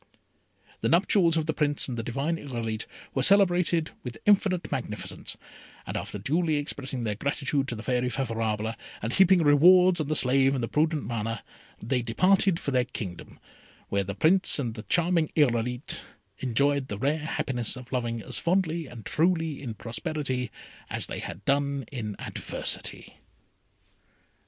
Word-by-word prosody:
The -, -, 0 dB
nuptials 170 Hz, -1 st, +4 dB
of 160 Hz, -, 0 dB
the 155 Hz, -, 0 dB
Prince 145 Hz, -1 st, +1 dB
and 125 Hz, -, -4 dB
the 115 Hz, -, -2 dB
divine 140 Hz, +8 st, -2 dB
Irolite 115 Hz, -6 st, -4 dB, 0.3 s
were 130 Hz, -, 0 dB
celebrated 175 Hz, -2 st, +3 dB
with 120 Hz, -3 st, -6 dB
infinite 195 Hz, -3 st, +3 dB
magnificence, 105 Hz, -5 st, -4 dB, 0.5 s
and -, -, -5 dB
after -, -, -4 dB
duly 155 Hz, -, +1 dB
expressing 140 Hz, -3 st, -3 dB
their 105 Hz, -2 st, -1 dB
gratitude 140 Hz, +4 st, -1 dB
to 120 Hz, -, -3 dB
the 110 Hz, -, -8 dB
Fairy 125 Hz, 0 st, 0 dB
Favourable, 110 Hz, -4 st, -1 dB, 0.3 s
and 115 Hz, +3 st, -2 dB
heaping 190 Hz, -2 st, +5 dB
rewards 175 Hz, +4 st, +6 dB
on 150 Hz, -, -3 dB
the 155 Hz, -, 0 dB
slave 135 Hz, 0 st, +4 dB
and 125 Hz, -, -2 dB
the -, -, 0 dB
prudent 155 Hz, +1 st, +1 dB
Mana, 115 Hz, -1 st, -3 dB, 0.4 s
they 125 Hz, +1 st, +1 dB
departed 185 Hz, -, +3 dB
for 140 Hz, -, -3 dB
their 125 Hz, -2 st, +2 dB
kingdom, 95 Hz, -8 st, -7 dB, 0.5 s
where 100 Hz, 0 st, +1 dB
the 100 Hz, 0 st, -5 dB
Prince 185 Hz, -, +4 dB
and 120 Hz, -6 st, -2 dB
the 110 Hz, -, -7 dB
charming 170 Hz, -2 st, +2 dB
Irolite 125 Hz, -3 st, +1 dB, 0.4 s
enjoyed 140 Hz, +2 st, +1 dB
the 105 Hz, -, -5 dB
rare 145 Hz, +8 st, 0 dB
happiness 135 Hz, -7 st, -2 dB
of 130 Hz, -1 st, -11 dB
loving 120 Hz, -3 st, -2 dB
as -, -, -2 dB
fondly 170 Hz, -3 st, 0 dB
and 120 Hz, -4 st, -11 dB
truly 165 Hz, -2 st, +1 dB
in 120 Hz, -5 st, -5 dB
prosperity 130 Hz, 0 st, -3 dB, 0.4 s
as -, -, -1 dB
they -, -, -5 dB
had 100 Hz, -, -7 dB
done 140 Hz, 0 st, +1 dB
in 110 Hz, -6 st, -4 dB
adversity. -, -, -3 dB
140 Hz, 155 wpm, -27 LUFS, 120-160 Hz, 0.5 s, rewards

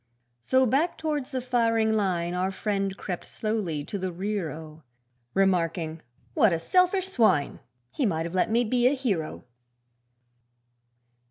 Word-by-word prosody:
So 260 Hz, -, +3 dB
back 275 Hz, +9 st, +1 dB
towards 295 Hz, -4 st, -2 dB
the 260 Hz, -3 st, -3 dB
firing 230 Hz, -3 st, +2 dB
line 180 Hz, -5 st, 0 dB
Our 180 Hz, +1 st, 0 dB
friend 195 Hz, 0 st, -2 dB
crept 180 Hz, -4 st, -5 dB
slowly 205 Hz, -9 st, -3 dB
to 200 Hz, -, -4 dB
the 185 Hz, 0 st, -2 dB
rear 190 Hz, -1 st, -2 dB
oh! 155 Hz, 0 st, -10 dB, 0.5 s
Remarking 170 Hz, -4 st, +1 dB, 0.3 s
'What 215 Hz, -, +4 dB
a 165 Hz, -, +1 dB
selfish 365 Hz, -, +2 dB
swine! 220 Hz, -, +2 dB, 0.3 s
He 270 Hz, -, 0 dB
might 165 Hz, -4 st, -1 dB
have 170 Hz, -, -6 dB
let 185 Hz, -, +1 dB
me 235 Hz, +2 st, +3 dB
be 245 Hz, +2 st, +2 dB
a 275 Hz, -, +3 dB
hero.' 200 Hz, -, -2 dB
200 Hz, 145 wpm, -27 LUFS, 170-245 Hz, 0.5 s, What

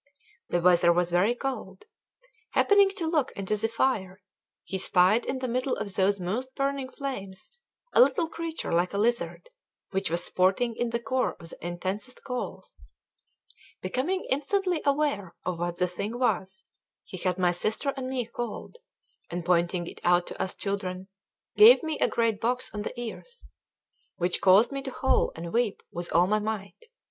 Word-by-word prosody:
The 175 Hz, -, +1 dB
weather 175 Hz, 0 st, +5 dB
was 175 Hz, 0 st, +1 dB
very 195 Hz, +7 st, +3 dB
cold. 235 Hz, -8 st, -5 dB, 0.7 s
Happening 405 Hz, -1 st, +5 dB
to 355 Hz, -5 st, -2 dB
look 315 Hz, -5 st, +1 dB
into 200 Hz, +2 st, -2 dB
the 215 Hz, +2 st, 0 dB
fire, 215 Hz, -5 st, 0 dB, 0.4 s
he 190 Hz, -, -4 dB
spied 190 Hz, +5 st, +3 dB
in 265 Hz, -, -1 dB
the 255 Hz, 0 st, -3 dB
middle 255 Hz, +2 st, 0 dB
of 205 Hz, -2 st, -5 dB
those 195 Hz, +1 st, +2 dB
most 235 Hz, +9 st, -3 dB
burning 275 Hz, -1 st, -1 dB
flames 250 Hz, -, -6 dB, 0.4 s
a -, -, +7 dB
little 280 Hz, +6 st, +4 dB
creature 330 Hz, 0 st, -5 dB
like 175 Hz, +3 st, +1 dB
a -, -, -1 dB
lizard, 235 Hz, -, -1 dB, 0.4 s
which 195 Hz, -2 st, -1 dB
was 170 Hz, +1 st, -1 dB
sporting 195 Hz, +6 st, +1 dB
in 240 Hz, +1 st, -1 dB
the 235 Hz, 0 st, -1 dB
core 255 Hz, +2 st, -1 dB
of 165 Hz, -, -8 dB
the -, -, -10 dB
intensest 185 Hz, +8 st, -4 dB
coals. 250 Hz, -2 st, -6 dB, 1.0 s
Becoming 360 Hz, +9 st, -1 dB
instantly 355 Hz, +5 st, +1 dB
aware 275 Hz, -, 0 dB
of 180 Hz, -2 st, -2 dB
what 175 Hz, 0 st, -2 dB
the 180 Hz, -, +2 dB
thing 200 Hz, +6 st, -4 dB
was, 190 Hz, -6 st, -1 dB, 0.4 s
he 185 Hz, -, -9 dB
had 180 Hz, 0 st, -1 dB
my 180 Hz, -1 st, +3 dB
sister 215 Hz, +10 st, -1 dB
and 260 Hz, -1 st, -4 dB
me 255 Hz, -2 st, -1 dB
called, 240 Hz, -, -6 dB, 0.5 s
and 175 Hz, 0 st, -4 dB
pointing 175 Hz, 0 st, +1 dB
it -, -, -10 dB
out 175 Hz, 0 st, +4 dB
to -, -, -6 dB
us 185 Hz, -, -2 dB
children, 190 Hz, -1 st, -4 dB, 0.5 s
gave 235 Hz, +5 st, +9 dB
me 315 Hz, -2 st, -2 dB
a -, -, +4 dB
great 230 Hz, -3 st, 0 dB
box 245 Hz, +2 st, -1 dB
on 210 Hz, -, -3 dB
the 240 Hz, -, -5 dB
ears, 470 Hz, -, -8 dB, 0.7 s
which 175 Hz, 0 st, 0 dB
caused 195 Hz, +6 st, +6 dB
me 275 Hz, 0 st, -3 dB
to 270 Hz, -, -5 dB
howl 265 Hz, -, +3 dB
and 170 Hz, +1 st, -7 dB
weep 235 Hz, -3 st, 0 dB
with 175 Hz, 0 st, -5 dB
all 175 Hz, +1 st, +5 dB
my 210 Hz, +3 st, +2 dB
might. 215 Hz, -, -5 dB
215 Hz, 175 wpm, -27 LUFS, 185-260 Hz, 1.0 s, gave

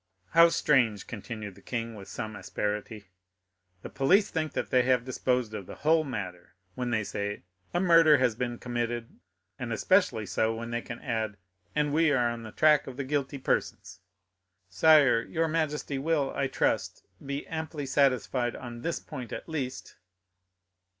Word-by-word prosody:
"How 170 Hz, +1 st, +7 dB
strange," 120 Hz, -, +2 dB
continued 110 Hz, -2 st, -7 dB
the -, -, -17 dB
king, 115 Hz, -1 st, -4 dB
with 100 Hz, -3 st, -10 dB
some 110 Hz, +1 st, -5 dB
asperity; 105 Hz, +1 st, -4 dB, 0.7 s
"the -, -, -6 dB
police 195 Hz, +10 st, +3 dB
think 155 Hz, -2 st, -2 dB
that -, -, -3 dB
they 125 Hz, -, +5 dB
have 125 Hz, -1 st, +2 dB
disposed 125 Hz, -3 st, -1 dB
of 100 Hz, -4 st, -6 dB
the -, -, -8 dB
whole 160 Hz, +1 st, +3 dB
matter 90 Hz, -, -6 dB, 0.2 s
when 125 Hz, +4 st, -3 dB
they 110 Hz, -3 st, +1 dB
say, 105 Hz, 0 st, -4 dB, 0.3 s
'A 175 Hz, -, 0 dB
murder 165 Hz, -4 st, +6 dB
has 125 Hz, -3 st, +2 dB
been 120 Hz, +1 st, -3 dB
committed,' 120 Hz, -1 st, -4 dB, 0.4 s
and 125 Hz, -2 st, -4 dB
especially 115 Hz, -, +2 dB
so 110 Hz, +3 st, 0 dB
when 115 Hz, +1 st, -6 dB
they 120 Hz, 0 st, -1 dB
can 115 Hz, 0 st, -8 dB
add, 110 Hz, -5 st, -2 dB, 0.4 s
'And 150 Hz, -1 st, +1 dB
we 160 Hz, 0 st, +4 dB
are 120 Hz, -4 st, +2 dB
on 120 Hz, 0 st, -6 dB
the 110 Hz, -1 st, -9 dB
track 150 Hz, +2 st, +4 dB
of 130 Hz, -1 st, -8 dB
the 140 Hz, -, -2 dB
guilty 140 Hz, 0 st, -2 dB
persons.'" 90 Hz, -8 st, -2 dB, 0.7 s
"Sire, 135 Hz, -, +5 dB
your 165 Hz, +7 st, -1 dB
majesty 150 Hz, -3 st, -1 dB
will, 145 Hz, -1 st, 0 dB
I 140 Hz, -, 0 dB
trust, -, -, -1 dB, 0.2 s
be 140 Hz, +1 st, -4 dB
amply 160 Hz, -2 st, -5 dB
satisfied 130 Hz, -3 st, +1 dB
on 120 Hz, -1 st, -8 dB
this 170 Hz, +6 st, -2 dB
point 130 Hz, -6 st, -8 dB
at -, -, -6 dB
least." 140 Hz, -6 st, -5 dB
125 Hz, 165 wpm, -28 LUFS, 115-150 Hz, 0.7 s, How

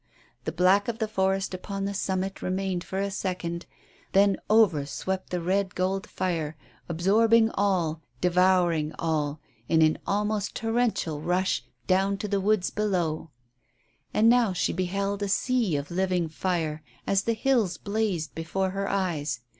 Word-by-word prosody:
The -, -, -1 dB
black 190 Hz, +3 st, +3 dB
of 235 Hz, -2 st, -2 dB
the 220 Hz, -2 st, -1 dB
forest 195 Hz, -2 st, 0 dB
upon 195 Hz, +2 st, -4 dB
the 200 Hz, -, -2 dB
summit 190 Hz, 0 st, -2 dB
remained 185 Hz, -1 st, -1 dB
for 190 Hz, -, -5 dB
a 200 Hz, 0 st, -1 dB
second, 180 Hz, -3 st, -3 dB, 0.5 s
then 195 Hz, 0 st, +5 dB
over 210 Hz, -9 st, +5 dB
swept 190 Hz, +5 st, -3 dB
the 180 Hz, -, -1 dB
red 190 Hz, +2 st, 0 dB
gold 190 Hz, +2 st, -1 dB
fire, 160 Hz, -4 st, -2 dB, 0.3 s
absorbing 220 Hz, +7 st, +4 dB
all, 175 Hz, -6 st, 0 dB, 0.2 s
devouring 180 Hz, -3 st, +3 dB
all, 155 Hz, -2 st, -1 dB, 0.3 s
in 160 Hz, -1 st, +5 dB
an 155 Hz, 0 st, +3 dB
almost 210 Hz, 0 st, -1 dB
torrential 225 Hz, -9 st, 0 dB
rush 180 Hz, +3 st, 0 dB, 0.2 s
down 195 Hz, +1 st, +2 dB
to 210 Hz, -, -4 dB
the 200 Hz, -1 st, 0 dB
woods 205 Hz, -1 st, +1 dB
below. 175 Hz, -7 st, -1 dB, 0.8 s
And 220 Hz, -, +3 dB
now 235 Hz, -4 st, +4 dB
she 180 Hz, -, 0 dB
beheld 195 Hz, +3 st, -1 dB
a 205 Hz, -, 0 dB
sea 230 Hz, -, +1 dB
of 140 Hz, +2 st, -3 dB
living 180 Hz, -2 st, 0 dB
fire 160 Hz, -2 st, -2 dB, 0.2 s
as 195 Hz, -1 st, +2 dB
the 230 Hz, -, +2 dB
hills 225 Hz, -5 st, +1 dB
blazed 200 Hz, -7 st, -2 dB
before 185 Hz, +4 st, -2 dB
her 195 Hz, +1 st, -2 dB
eyes. 155 Hz, -9 st, -1 dB
190 Hz, 150 wpm, -27 LUFS, 170-200 Hz, 0.8 s, then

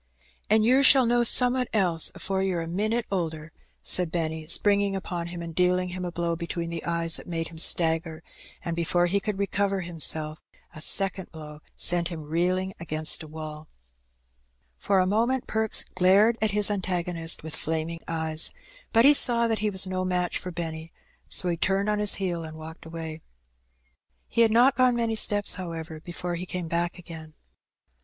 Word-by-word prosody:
"An' 215 Hz, +1 st, +4 dB
yer 255 Hz, +4 st, +4 dB
shall 270 Hz, -2 st, +6 dB
know 240 Hz, +1 st, +2 dB
some'at 250 Hz, +1 st, +4 dB
else 180 Hz, -6 st, +3 dB
afore 190 Hz, 0 st, -3 dB
yer 190 Hz, -3 st, -1 dB
a 165 Hz, -, -4 dB
minit 215 Hz, +7 st, -1 dB
older," 160 Hz, -4 st, -3 dB, 0.3 s
said 180 Hz, -3 st, +2 dB
Benny, 160 Hz, -2 st, -3 dB
springing 200 Hz, +3 st, +2 dB
upon 175 Hz, -2 st, -4 dB
him, 175 Hz, 0 st, -7 dB
and 165 Hz, -1 st, -7 dB
dealing 180 Hz, +1 st, +1 dB
him 180 Hz, +1 st, -6 dB
a 175 Hz, -, -4 dB
blow 170 Hz, 0 st, -2 dB
between 170 Hz, 0 st, -5 dB
the 165 Hz, -1 st, -5 dB
eyes 170 Hz, -1 st, 0 dB
that -, -, -12 dB
made 165 Hz, -2 st, -3 dB
him 165 Hz, -1 st, -12 dB
stagger; 160 Hz, -1 st, +1 dB, 0.4 s
and, 170 Hz, -, -2 dB
before 175 Hz, +1 st, +1 dB
he 190 Hz, +3 st, +1 dB
could 205 Hz, 0 st, -4 dB
recover 200 Hz, 0 st, -1 dB
himself, 160 Hz, -2 st, 0 dB, 0.3 s
a 155 Hz, -, -10 dB
second 195 Hz, +1 st, 0 dB
blow 150 Hz, -2 st, -10 dB, 0.2 s
sent 175 Hz, -1 st, +2 dB
him 165 Hz, -3 st, -7 dB
reeling 180 Hz, +5 st, -1 dB
against 155 Hz, -2 st, +1 dB
a 160 Hz, -, -9 dB
wall 155 Hz, 0 st, -8 dB, 1.1 s
For 195 Hz, -, +1 dB
a 185 Hz, -, +3 dB
moment 235 Hz, +6 st, 0 dB
Perks 220 Hz, -1 st, 0 dB
glared 200 Hz, +5 st, +4 dB
at 220 Hz, -, +2 dB
his 210 Hz, 0 st, +2 dB
antagonist 175 Hz, -4 st, -1 dB
with 160 Hz, -1 st, -4 dB
flaming 160 Hz, +1 st, -3 dB
In -, -, -24 dB
the -, -, -5 dB
Woods. 165 Hz, -, -2 dB
99 160 Hz, -, -3 dB
eyes, 155 Hz, +1 st, +1 dB, 0.4 s
but 230 Hz, +1 st, +5 dB
he 290 Hz, -, +8 dB
saw 235 Hz, -4 st, +3 dB
that 225 Hz, -1 st, -1 dB
he 210 Hz, +1 st, 0 dB
was 190 Hz, -1 st, +3 dB
no 185 Hz, 0 st, -3 dB
match 180 Hz, -1 st, -1 dB
for 185 Hz, -, -7 dB
Benny, 165 Hz, -1 st, -6 dB, 0.4 s
so 180 Hz, -, +3 dB
he 170 Hz, -1 st, -1 dB
turned 195 Hz, +4 st, +1 dB
on 210 Hz, 0 st, 0 dB
his 210 Hz, -1 st, +4 dB
heel 175 Hz, -4 st, -3 dB
and 155 Hz, 0 st, -9 dB
walked 160 Hz, +1 st, -11 dB
away. 160 Hz, -1 st, -7 dB, 1.1 s
He 235 Hz, -, 0 dB
had 230 Hz, -, +5 dB
not 245 Hz, +4 st, +5 dB
gone 255 Hz, -2 st, +3 dB
many 230 Hz, -1 st, -1 dB
steps, 205 Hz, -1 st, +4 dB
however, 165 Hz, -3 st, -7 dB
before 175 Hz, +2 st, -6 dB
he 175 Hz, +2 st, -5 dB
came 180 Hz, -2 st, -5 dB
back 170 Hz, +2 st, -2 dB
again. 160 Hz, -3 st, -11 dB
175 Hz, 190 wpm, -26 LUFS, 165-200 Hz, 1.1 s, he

